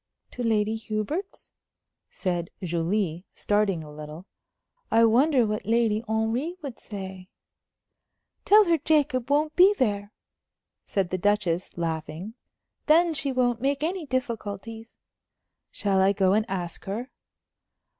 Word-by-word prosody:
"To 245 Hz, -, -7 dB
Lady 220 Hz, -2 st, +1 dB
Hubert's?" 220 Hz, -, -4 dB, 0.6 s
said 175 Hz, -3 st, -3 dB
Julie, 175 Hz, +1 st, -1 dB
starting 205 Hz, -5 st, 0 dB
a 150 Hz, -1 st, -11 dB
little. 150 Hz, +3 st, -9 dB, 0.6 s
"I 230 Hz, 0 st, +5 dB
wonder 250 Hz, +3 st, +4 dB
what 210 Hz, -1 st, -3 dB
Lady 225 Hz, -1 st, +2 dB
Henry 225 Hz, +9 st, -1 dB
would 270 Hz, -5 st, -7 dB
say?" 190 Hz, -2 st, -8 dB, 1.1 s
"Tell 425 Hz, +2 st, +7 dB
her 335 Hz, -2 st, +2 dB
Jacob 285 Hz, -5 st, +1 dB
won't 300 Hz, +2 st, +1 dB
be 385 Hz, +3 st, +6 dB
there," 205 Hz, -4 st, 0 dB, 0.7 s
said 190 Hz, -3 st, -1 dB
the 185 Hz, -, -1 dB
Duchess, 185 Hz, -4 st, 0 dB
laughing. 165 Hz, +4 st, -4 dB, 0.5 s
"Then 330 Hz, +2 st, +5 dB
she 280 Hz, -2 st, -1 dB
won't 245 Hz, -2 st, +1 dB
make 280 Hz, +2 st, 0 dB
any 340 Hz, -1 st, -2 dB
difficulties." 225 Hz, -3 st, -4 dB, 0.7 s
"Shall 195 Hz, -2 st, +1 dB
I 195 Hz, +1 st, +4 dB
go 190 Hz, -1 st, +2 dB
and 215 Hz, +1 st, +1 dB
ask 175 Hz, -3 st, -4 dB
her?" 220 Hz, +7 st, -4 dB
220 Hz, 125 wpm, -26 LUFS, 190-260 Hz, 1.1 s, Tell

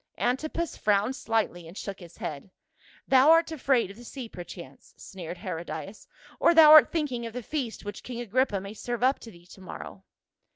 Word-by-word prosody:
Antipas 310 Hz, +6 st, -1 dB
frowned 210 Hz, +5 st, +1 dB
slightly 220 Hz, -, -2 dB
and 170 Hz, +5 st, -12 dB
shook 200 Hz, -2 st, -6 dB
his 175 Hz, -2 st, -14 dB
head. 150 Hz, +4 st, -6 dB, 0.6 s
"Thou 265 Hz, +2 st, +6 dB
art 330 Hz, 0 st, +5 dB
afraid 260 Hz, -8 st, +1 dB
of 200 Hz, -, -14 dB
the 240 Hz, -, -12 dB
sea 250 Hz, 0 st, -8 dB
perchance," 175 Hz, -8 st, -11 dB
sneered 180 Hz, -3 st, -8 dB
Herodias, 185 Hz, +2 st, -7 dB, 0.2 s
" -, -, -23 dB
or 340 Hz, -, +4 dB
thou 315 Hz, -2 st, +9 dB
art 310 Hz, -1 st, +9 dB
thinking 260 Hz, -8 st, -2 dB
of 225 Hz, -, -9 dB
the 250 Hz, 0 st, -5 dB
feast 250 Hz, -6 st, -4 dB
which 205 Hz, 0 st, -6 dB
king 245 Hz, -2 st, -7 dB
Agrippa 240 Hz, -2 st, 0 dB
may 200 Hz, +2 st, -8 dB
serve 240 Hz, +2 st, -4 dB
up 265 Hz, +2 st, +3 dB
to 230 Hz, -, -11 dB
thee 175 Hz, -4 st, -17 dB
to 190 Hz, +2 st, -15 dB
morrow." 185 Hz, -, -9 dB
225 Hz, 195 wpm, -27 LUFS, 190-265 Hz, 0.6 s, thou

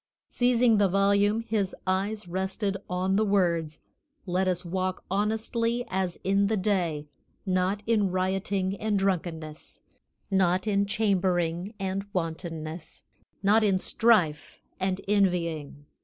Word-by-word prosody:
Seizing 245 Hz, -3 st, +3 dB
the 200 Hz, -, +4 dB
volume, 200 Hz, +3 st, +3 dB
his 215 Hz, -4 st, -1 dB
eyes 195 Hz, +2 st, -1 dB
rested 190 Hz, +3 st, -2 dB
on 185 Hz, +2 st, 0 dB
the 215 Hz, -, +3 dB
words, 170 Hz, -6 st, +1 dB, 0.4 s
"Let 185 Hz, 0 st, 0 dB
us 180 Hz, 0 st, 0 dB
walk 185 Hz, +1 st, -2 dB
honestly 225 Hz, +4 st, 0 dB
as 185 Hz, -2 st, -1 dB
in 195 Hz, +1 st, +2 dB
the 220 Hz, +1 st, 0 dB
day; 180 Hz, -7 st, 0 dB, 0.4 s
not 185 Hz, +2 st, 0 dB
in 215 Hz, -4 st, +2 dB
rioting 190 Hz, +1 st, -1 dB
and 215 Hz, 0 st, 0 dB
drunkenness, 165 Hz, -5 st, -3 dB, 0.5 s
not 185 Hz, -1 st, +2 dB
in 200 Hz, -1 st, +1 dB
chambering 190 Hz, -3 st, 0 dB
and 195 Hz, 0 st, -2 dB
wantonness, 165 Hz, -1 st, -5 dB, 0.4 s
not 215 Hz, +3 st, +4 dB
in 195 Hz, -3 st, +3 dB
strife 185 Hz, -7 st, +2 dB, 0.2 s
and 190 Hz, 0 st, -1 dB
envying. 170 Hz, -8 st, 0 dB
190 Hz, 120 wpm, -27 LUFS, 180-205 Hz, 0.5 s, the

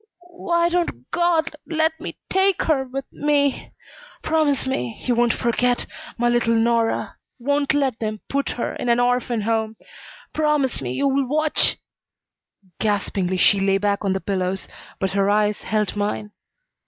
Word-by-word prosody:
"Why 340 Hz, -1 st, +1 dB
don't 345 Hz, 0 st, -2 dB
God 340 Hz, -2 st, +1 dB
let 320 Hz, -1 st, 0 dB
me -, -, -6 dB
take 385 Hz, 0 st, +2 dB
her 280 Hz, -4 st, +1 dB
with 265 Hz, +1 st, -5 dB
me? 285 Hz, -2 st, 0 dB, 0.5 s
Promise 310 Hz, -4 st, +1 dB
me 125 Hz, -, -3 dB
you 250 Hz, -, +2 dB
won't 240 Hz, 0 st, +3 dB
forget 245 Hz, +1 st, +1 dB, 0.3 s
my 240 Hz, 0 st, +1 dB
little 240 Hz, -1 st, +2 dB
Nora! 230 Hz, 0 st, +1 dB, 0.2 s
Won't 285 Hz, +3 st, +1 dB
let 270 Hz, -5 st, 0 dB
them 215 Hz, -1 st, -3 dB
put 280 Hz, 0 st, -1 dB
her 240 Hz, -, -3 dB
in 245 Hz, -, -2 dB
an 235 Hz, 0 st, +4 dB
orphan 245 Hz, -2 st, +1 dB
home. 220 Hz, 0 st, -1 dB, 0.6 s
Promise 300 Hz, -, +1 dB
me 125 Hz, -1 st, -3 dB
you'll 275 Hz, -, +1 dB
watch 310 Hz, +3 st, +2 dB, 0.5 s
" 185 Hz, -3 st, -37 dB
Gaspingly 195 Hz, -3 st, 0 dB
she 200 Hz, +2 st, +4 dB
lay 195 Hz, 0 st, +2 dB
back 200 Hz, 0 st, 0 dB
on 195 Hz, -2 st, +1 dB
the 190 Hz, -, -1 dB
pillows, 190 Hz, -1 st, -2 dB, 0.3 s
but 190 Hz, -1 st, 0 dB
her 195 Hz, 0 st, +1 dB
eyes 210 Hz, 0 st, +2 dB
held 215 Hz, -2 st, -1 dB
mine. 210 Hz, 0 st, -2 dB
240 Hz, 155 wpm, -22 LUFS, 205-290 Hz, 0.6 s, an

